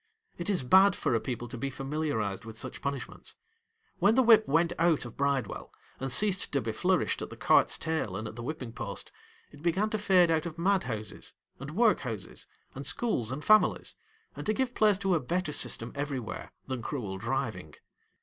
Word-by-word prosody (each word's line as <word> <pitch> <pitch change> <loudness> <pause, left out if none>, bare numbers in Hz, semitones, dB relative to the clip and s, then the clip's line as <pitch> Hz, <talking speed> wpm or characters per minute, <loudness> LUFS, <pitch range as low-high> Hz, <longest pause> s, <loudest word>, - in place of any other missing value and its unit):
It 175 - -3
is 190 -9 +1
bad 190 +8 +6
for - - 0
a 115 - +3
people 120 0 -4
to 120 0 -7
be 140 - -2
familiarised 135 -7 -2
with 110 -1 -9
such - - -5
punish 140 -1 -3
ments. - - -10 0.6
When 200 +4 +4
the 260 - +5
whip 225 -2 +6
went 165 +4 +2
out 165 -5 +3
of 120 - -9
Bride 140 -3 +1
well, - - -8 0.3
and 135 0 -3
ceased 195 +4 +3
to 140 - +3
be 115 -3 -3
flourished 180 +10 +1
at - - -5
the - - -10
cart's - - +4
tail 160 - -2
and 110 +2 -4
at 110 - -8
the 120 - -7
whipping 130 -2 -5
post, - - -6 0.4
it 145 - -14
began 190 +6 +1
;o - - +2
fade 185 -4 +4
out 160 +1 +1
of 165 0 -8
madhouses, 165 - -1 0.3
and 140 +4 -7
workhouses, 130 - 0 0.3
and 135 +1 -5
schools, 130 - 0
and 145 +3 -5
families, 215 0 +4 0.4
and - - -6
to 215 - +3
give 255 +2 -1
place 210 -4 +4
;o 190 - +3
a 170 - +3
better 165 +3 -2
system 120 -3 -2
everywhere, 140 -5 -4
than 130 -2 -4
cruel 105 -7 -4
driving. 110 - -3
145 Hz, 200 wpm, -29 LUFS, 120-185 Hz, 0.6 s, bad